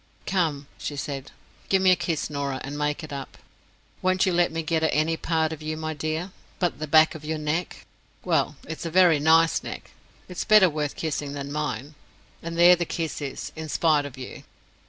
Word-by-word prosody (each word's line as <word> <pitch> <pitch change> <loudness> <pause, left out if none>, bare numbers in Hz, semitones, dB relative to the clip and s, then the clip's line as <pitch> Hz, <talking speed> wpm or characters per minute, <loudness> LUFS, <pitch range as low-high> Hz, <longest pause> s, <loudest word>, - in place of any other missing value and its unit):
—Come!" 160 -7 0
she 145 - -4
said, 140 -1 -5 0.4
"give 195 - +4
me 190 0 +5
a - - +6
kiss, 165 -3 -2
Norah, 140 -2 -3
and 140 +2 -6
make 150 +2 -1
it 155 - -7
up. 135 -1 -7 0.6
Won't 185 0 +2
you 185 - +1
let 175 0 +3
me 165 0 -3
get 160 0 0
at 160 - +2
any 155 +2 +1
part 160 -1 0
of 155 - -9
you, 155 0 -4
my 155 0 -3
dear, 155 +5 -3 0.3
but 175 -4 -1
the 155 - -4
back 155 +2 +6
of 155 - -9
your 155 +1 -2
neck? 155 +3 -3 0.4
Well, - - +1
it's 160 +2 -6
a 165 - -3
very 175 -3 +5
nice 160 +2 +4
neck—it's 180 - -9
better 210 -5 +6
worth 150 -1 -2
kissing 145 -3 -3
than 140 0 -5
mine—and 150 +3 -6
there 175 +1 +8
the 175 - -1
kiss 165 -2 -4
is, 140 -2 -5
in 160 -1 -6
spite 150 -2 +2
of 135 - -12
you!" 130 - -8
155 Hz, 200 wpm, -25 LUFS, 145-170 Hz, 0.6 s, there